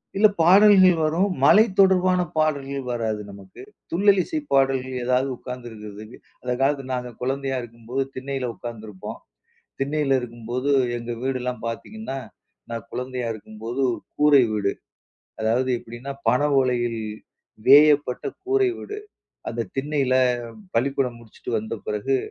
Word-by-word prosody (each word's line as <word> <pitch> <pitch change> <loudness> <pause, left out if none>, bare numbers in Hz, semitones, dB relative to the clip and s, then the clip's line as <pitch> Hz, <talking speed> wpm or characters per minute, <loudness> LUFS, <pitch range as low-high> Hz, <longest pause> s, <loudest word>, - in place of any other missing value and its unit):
சில 210 +2 +6
பாடல்கள் 190 +1 +7
வரும். 165 +6 +2 0.2
மழை 210 +9 +8 0.2
தொடர்பான 185 -1 +5 0.2
பாடல்கள் 140 -3 0
வராது 110 -3 -2
நமக்கு. 100 -1 -13 0.3
துள்ளலிசை 200 - +3
பாடல்கள் 135 -1 +2
ஏதாவது 125 +2 +2
உட்காந்துருக்கிறதுக்கு 110 -3 -9 0.2
அந்த 125 0 -2
காலத்தில 135 -1 +1
நாங்க 125 -1 -5
குழந்தையா 135 +1 -1
இருக்கும்போது, 120 +3 -4
திண்ணையில 130 -1 -3
உட்காந்துருப்போம். 110 -5 -8 0.6
திண்ணையில 140 -1 +1
இருக்கும்போது 120 +3 -4 0.3
எங்க 120 0 -6
வீடெல்லாம் 125 -2 -3
பார்த்தீங்கன்னா, 215 - -6 0.5
நான் 115 -3 -5
குழந்தையா 125 -1 -4
இருக்கும்போது, 110 +3 -7
ஒரு - - -6 0.2
கூரை 145 -3 +6
வீடு. 100 -2 0 0.7
அதாவது 120 +4 +1
எப்படின்னா, 120 +5 -8 0.2
பனை 125 +5 +3
ஓலையில் 120 -3 0 0.7
வேயப்பட்ட 145 -1 +6 0.2
கூரை 390 0 +2
வீடு. 420 0 -7 0.5
அந்த 115 0 -3
திண்ணையில 135 -1 0 0.6
பள்ளிக்கூடம் 130 0 0
முடிச்சுட்டு 115 0 -9
வந்த 110 +1 -5
பிறகு, 105 +6 0
130 Hz, 115 wpm, -23 LUFS, 115-145 Hz, 0.7 s, மழை